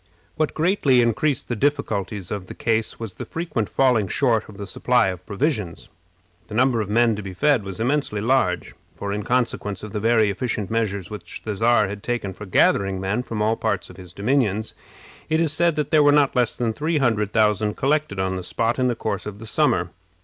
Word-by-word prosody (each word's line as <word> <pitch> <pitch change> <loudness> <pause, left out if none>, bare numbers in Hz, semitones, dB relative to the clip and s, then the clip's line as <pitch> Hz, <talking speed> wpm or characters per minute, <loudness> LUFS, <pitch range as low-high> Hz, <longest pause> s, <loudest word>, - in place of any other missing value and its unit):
What 155 -1 -1
greatly 155 -6 +3
increased 120 +4 0
the 120 - -2
difficulties 105 - -1
of 100 -3 -4
the - - -9
case 110 -1 0
was 110 -5 -6
the - - -7
frequent 160 - -3
falling 125 -7 +2
short 115 -1 +1
of 105 - -12
the 100 - -6
supply 120 +2 +2
of 90 -1 -6
provisions. 105 - -2 0.6
The - - -7
number 120 -1 +3
of 105 - -4
men 115 +1 +3
to - - -4
be 95 -2 -8
fed 140 +5 +3
was 95 +1 -7
immensely 125 -3 0
large; 105 -7 +1 0.2
for, 100 0 -4
in 105 - -2
consequence 110 -4 -1
of 105 - -7
the 105 - -1
very 110 -1 +3
efficient 105 -1 -3
measures 105 -4 -1
which 90 -5 -7
the 110 -2 -2
Czar 115 +1 +3
had 100 +1 -6
taken 120 -5 -3
for 105 +2 -10
gathering 95 +1 +2
men 95 +5 -1
from 115 -4 -3
all 110 +1 +2
parts 100 -5 -2
of - - -15
his 90 -2 -11
dominions, 110 0 0 0.6
it 160 0 +2
is 160 -3 +1
said 170 0 +2
that 150 -1 -2
there 155 - +5
were 145 0 +6
not 145 -2 +3
less 125 -3 +1
than 115 -2 0
three 155 +6 -1
hundred 110 -7 +1
thousand 105 -1 +2
collected 145 -7 0
on 95 0 -1
the - - -4
spot 115 +7 -1
in 130 - +2
the 120 - 0
course 105 -3 -3
of 105 -1 -7
the 110 - -10
summer. - - +1
110 Hz, 215 wpm, -23 LUFS, 100-130 Hz, 0.6 s, were